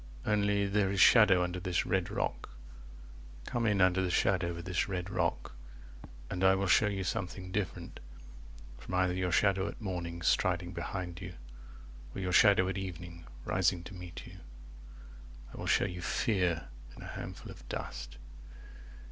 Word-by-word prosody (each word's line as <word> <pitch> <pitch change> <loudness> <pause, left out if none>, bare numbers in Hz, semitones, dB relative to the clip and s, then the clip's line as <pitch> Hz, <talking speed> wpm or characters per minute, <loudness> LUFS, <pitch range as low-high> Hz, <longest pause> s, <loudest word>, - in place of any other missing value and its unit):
Only 100 -1 +2
There 100 0 +1
is 100 - -1
shadow 100 -5 +7
under 90 +1 -3
this 90 -1 -1
red 90 -1 0
rock, - - -3 1.0
25 - - -9
(Come 120 -1 0
in 100 -2 +2
under 95 0 +4
the 95 - 0
shadow 90 0 +2
of 85 0 -8
this 90 +2 0
red 90 0 -3
rock), 90 -3 -1 0.8
And 90 +7 -3
I 95 0 +6
will 95 +1 0
show 105 +3 +4
you 100 -2 -2
something 90 0 -4
different 100 -3 -4 0.8
from 90 - -5
either 90 -1 +2
Your 90 -1 -1
shadow 100 +2 +2
at - - -7
morning 85 -5 -4
striding 90 +1 +1
behind 90 0 -5
you 90 -2 -7 0.8
Or - - -4
your 90 -1 -2
shadow 100 -1 +6
at 95 +1 -2
evening 85 -2 -7 0.2
rising 90 -1 +1
to 95 - -10
meet 90 -2 -9
you; - - -12 1.1
I - - -10
will - - -5
show - - +3
you 90 0 -5
fear 90 -5 0 0.3
in - - -10
a - - -8
handful - - -7
of - - -14
dust. 60 0 -6
90 Hz, 165 wpm, -32 LUFS, 90-95 Hz, 1.1 s, shadow